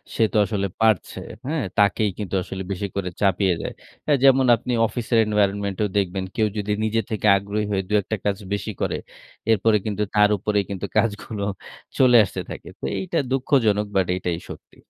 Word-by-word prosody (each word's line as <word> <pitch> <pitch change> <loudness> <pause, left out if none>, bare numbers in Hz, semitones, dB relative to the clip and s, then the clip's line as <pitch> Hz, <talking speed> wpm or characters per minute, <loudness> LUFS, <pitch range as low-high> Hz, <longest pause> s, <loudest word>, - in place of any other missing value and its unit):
সে 115 - +3
তো - - +2
আসলে 100 -2 -1
পারছে। 110 -5 +2 0.3
হ্যাঁ? 155 -1 -1
তাকেই 100 +1 +3
কিন্তু 100 -3 -4
আসলে 95 0 -6
বেশি 100 +1 -2
করে 95 -2 -2
চাপিয়ে 95 -2 +3
দেয়। - - -5 0.5
যেমন 135 -1 +6
আপনি 120 +2 -5 0.2
অফিসের 120 0 -1
এনভায়রনমেন্টেও 100 -1 0
দেখবেন। 95 -1 0
কেউ 110 -2 +2
যদি 105 0 -2
নিজে 110 +1 +1
থেকে 110 -1 -1
আগ্রহী 100 +2 -2
হয়ে 95 -1 0
দুই-একটা 105 +1 0
কাজ 100 -1 +1 0.2
বেশি 100 +2 -3
করে, - - 0 0.6
এরপরে 110 0 +3
কিন্তু 105 -1 -1
তার 105 0 +5
উপরেই 105 +1 0
কিন্তু 100 0 -4
কাজগুলো 105 -1 -1 0.5
চলে 125 -2 +5
আসতে 95 - -4
থাকে। - - -8
তো - - -5
এইটা 175 -3 -2
দুঃখজনক, 120 -6 +2
বাট 95 -2 +2
এটাই 85 -2 -2
সত্যি। - - -11
105 Hz, 170 wpm, -23 LUFS, 100-110 Hz, 0.6 s, যেমন